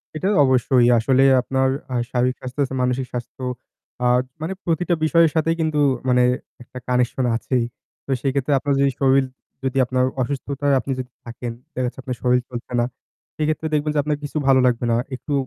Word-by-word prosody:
এটা 155 +5 -1 0.2
অবশ্যই। 130 -2 +3
আসলে 130 +3 +3 0.2
আপনার 130 +1 +1 0.2
আহ 120 - +1
শারীরিক 125 +1 +1
স্বাস্থ্যর 130 +3 -2
চে - - -6
মানসিক 125 +1 0
স্বাস্থ্য, 125 +1 -6 0.6
আহ 125 0 +4 0.2
মানে 165 +4 -2
প্রতিটা 175 +1 +1
বিষয়ের 165 -1 +4
সাথেই 165 +1 +2
কিন্তু 155 -2 0 0.3
মানে 125 0 +4 0.4
একটা 125 - -10
কানেকশন 125 +1 +1
আছেই। 120 0 0 0.4
তো - - -20
সেই 135 -1 +1
ক্ষেত্রে 140 +1 0
আপনার 140 +1 0
যদি 140 0 +3
শরীর 135 0 +4 0.4
যদি 130 0 -1
আপনার 130 0 +1 0.2
অসুস্থতায় 140 +2 -1
আপনি 135 - -4
যদি 125 0 -6
থাকেন, 120 0 -6 0.2
দেখাচ্ছে 125 0 -3
আপনার 125 -1 -4
শরীর 125 0 +3
চলছে 120 0 -7
না। 120 - +2 0.5
সেক্ষেত্রে 155 +1 -1
দেখবেন 150 0 +1
যে, 145 - +3
আপনার 150 0 -1
কিছু 145 +1 -4
ভালো 135 -1 +6
লাগবে 120 -1 +1
না। 115 - +3 0.2
একটু 145 +3 -5
130 Hz, 180 wpm, -22 LUFS, 125-145 Hz, 0.6 s, ভালো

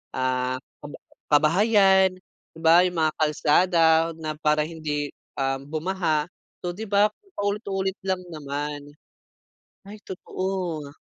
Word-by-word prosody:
ah, 130 0 0 0.2
kaba 145 - -10 0.3
kabahayan. 190 +4 +4 0.4
Di - - -11
ba 165 +2 +7
yung 180 - -5
mga 155 -1 +2
kalsada 160 +3 +3 0.3
na 155 -1 -6
para 150 -1 +2
hindi, 150 -3 -4 0.2
um, 135 0 -2
bumaha. 160 0 -1 0.3
So, 175 - -2
di 215 +4 -7
ba 205 +1 +3 0.2
paulit-ulit 200 -1 -2
lang 185 -1 -1
naman. 145 -1 -5 1.0
Ay 210 +1 -11
totoo. 180 -6 -4
160 Hz, 115 wpm, -25 LUFS, 150-190 Hz, 1.0 s, ba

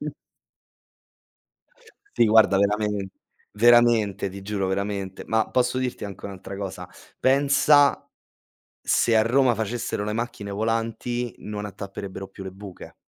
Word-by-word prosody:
Mh - - -5 2.0
Sì, - - +3
guarda 110 -2 +5
veramen 105 0 0 0.4
veramente 115 -3 +4
ti 100 +1 -9
giuro, 100 -1 -2
veramente, 100 0 -3
ma 110 -1 +1
posso 125 0 +1
dirti 125 -4 -3
anche 100 -2 -9
un'altra 100 0 -8
cosa? 95 -2 -6 0.3
Pensa, 140 +1 +4 0.7
se 115 - +2
a 110 - +5
Roma 125 +2 +3
facessero 110 -1 -3
le 105 - -3
macchine 115 -3 -4
volanti, 115 +3 -2
non 105 0 -6
attapperebbero 100 -1 -7
più 95 0 -11
le 95 - -6
buche. 95 0 -11
105 Hz, 125 wpm, -24 LUFS, 100-120 Hz, 2.0 s, guarda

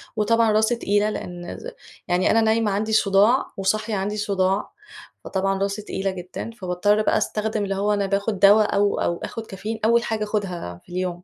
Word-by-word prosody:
وطبعًا 225 +1 +3
راسي 220 +3 +2
تقيلة 205 -2 +1
لأن 175 -4 -6
ز - - -8 0.4
يعني 180 +1 +2
أنا 225 - +4
نايمة 220 -1 +2
عندي 215 +2 -1
صُداع 210 +5 +4
وصاحية 215 +3 0
عندي 205 +2 -2
صُداع 195 -1 0 0.5
فطبعًا 195 0 -1
راسي 200 +1 -1
تقيلة 195 -1 -3
جدًا، 185 +4 -7
فباضطّر 205 0 0
بقى - - +2
أستخدم 215 0 -1
اللي 195 -1 -2
هو 205 +2 +1
أنا 200 -1 0
باخد 200 +1 -1
دوا، 205 +2 +7
أو 205 -1 +1
أو 170 - 0
آخد 225 -1 -6
كافيين 220 +3 -6
أول 235 +1 +4
حاجة 220 -1 -2
أخدها 180 - -4
في 175 - -17
اليوم، 180 -1 -3
205 Hz, 180 wpm, -23 LUFS, 190-220 Hz, 0.5 s, دوا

